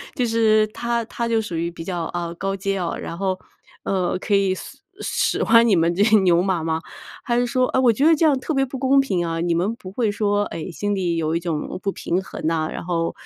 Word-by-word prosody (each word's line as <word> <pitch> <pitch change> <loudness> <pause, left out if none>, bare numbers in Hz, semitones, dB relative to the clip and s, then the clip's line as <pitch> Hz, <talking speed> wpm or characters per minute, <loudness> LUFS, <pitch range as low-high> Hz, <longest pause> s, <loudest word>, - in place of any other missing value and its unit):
就 250 -4 +1
是 220 -2 +3
他 235 +2 -2
他 235 0 -3
就 225 -1 +1
属 180 -6 -5
于 170 +1 -1
比 165 -1 -9
较， 175 -2 -3
哦， 170 -1 -3
高 195 0 -1
阶 195 0 -2
哦， 170 -2 -2
然 170 - -6
后， 190 -1 -1 0.5
呃， 185 -2 0
可 205 - -2
以 195 -1 +3
随 275 +8 -10 0.2
使 - - 0
唤 230 +1 +5
你 200 - +4
们 165 +1 +2
这 195 - -1
些 215 0 +6
牛 175 -2 +4
马 185 -4 0
吗？ 160 0 -1 0.5
还 240 -2 +1
是 245 - +2
说 255 +1 +1
唉， 260 - 0
我 240 -2 +5
觉 270 +7 +1
得 325 0 +6
这 320 - +2
样 280 -4 +3
特 310 - -3
别 270 -1 +2
不 260 0 -7
公 270 +1 +4
平 185 -10 -1
啊， 165 0 -2
你 170 -1 +1
们 190 +7 0
不 185 -5 -10
会 225 0 0
说， 205 0 +1
唉， 165 +2 -6
心 205 +4 -2
里 175 -3 -1
有 160 0 0
一 - - +1
种 165 -2 -3
不 195 - 0
平 185 +1 -2
衡 160 - -5
呐， 160 -1 0
然 - - -6
后， 165 -2 -1
195 Hz, 270 characters per minute, -22 LUFS, 170-230 Hz, 0.5 s, 些